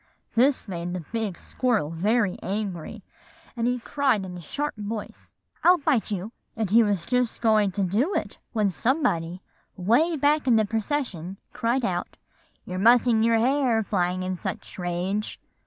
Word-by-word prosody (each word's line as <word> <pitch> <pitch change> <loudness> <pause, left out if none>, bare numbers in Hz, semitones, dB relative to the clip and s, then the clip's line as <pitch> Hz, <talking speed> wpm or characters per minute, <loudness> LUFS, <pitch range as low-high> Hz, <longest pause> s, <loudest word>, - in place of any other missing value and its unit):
"This 255 +2 +3
made 175 -2 -4
the 180 - -3
big 220 -6 -2
squirrel 225 - -1
very 205 +4 +1
angry; 195 -4 -4 0.5
and 235 -1 0
he 250 0 +1
cried 250 -4 0
in 180 -1 -7
a 175 - -8
sharp 290 - -3
voice, 210 0 -7 0.3
'I'll 360 +1 +7
bite 280 -7 +1
you;' 205 +1 -3 0.3
and 220 -4 -1
he 230 +2 +7
was 200 -6 0
just 250 -2 0
going 215 -3 +3
to 200 - 0
do 220 - +1
it, - - -3
when 210 -5 +1
somebody, 180 - 0 0.3
way 245 - +2
back 290 +1 +2
in 240 - +5
the 220 -1 +4
procession, 205 - -3 0.2
cried 235 +2 0
out, 175 -1 -3 0.5
'You're 185 0 -4
mussing 235 +1 +5
your 230 0 +4
hair, 245 -2 +2
flying 185 -2 0
in 185 -1 -3
such - - -6
a - - -3
rage. 180 +4 -2
215 Hz, 165 wpm, -25 LUFS, 185-245 Hz, 0.5 s, I'll